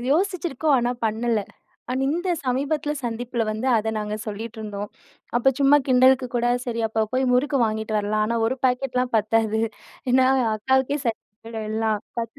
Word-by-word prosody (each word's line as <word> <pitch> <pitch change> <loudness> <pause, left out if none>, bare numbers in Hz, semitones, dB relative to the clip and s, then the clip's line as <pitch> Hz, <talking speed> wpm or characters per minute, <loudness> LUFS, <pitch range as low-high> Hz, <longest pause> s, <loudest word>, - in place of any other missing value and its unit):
யோசிச்சிருக்கோம் 325 -5 +1
ஆனா 240 0 +1
பண்ணல. 225 +1 +1 0.5
ஆனா 255 - -1
இந்த 350 +5 -1 0.2
சமீபத்துல 285 +4 0
சந்திப்புல 235 0 -2
வந்து, 220 +4 -3
அத 220 0 0
நாங்க 210 0 -3
சொல்லிட்ருந்தோம். 215 -1 -5 0.5
அப்ப 265 +3 +3
சும்மா 280 +1 +6
கிண்டலுக்கு 255 0 +5
கூட 240 0 +1 0.2
சரி 230 -1 -2
அப்ப 220 0 0
போய் 260 0 +2
முறுக்கு 280 +2 +2
வாங்கிட்டு 220 0 -2
வரலாம். 215 +1 0
ஆனா, 235 - -1
1 260 +3 -1
பாக்கெட்லாம் 250 -1 -1
பத்தாது. 220 0 +1 0.5
ஏன்னா 255 +1 +5 0.3
அக்காவுக்கே 265 +5 +1
சரியா 225 - -1 0.2
போய்டும் 225 -1 -5
எல்லாம். 220 -1 0 0.2
10 230 0 -7
240 Hz, 150 wpm, -23 LUFS, 220-265 Hz, 0.5 s, சும்மா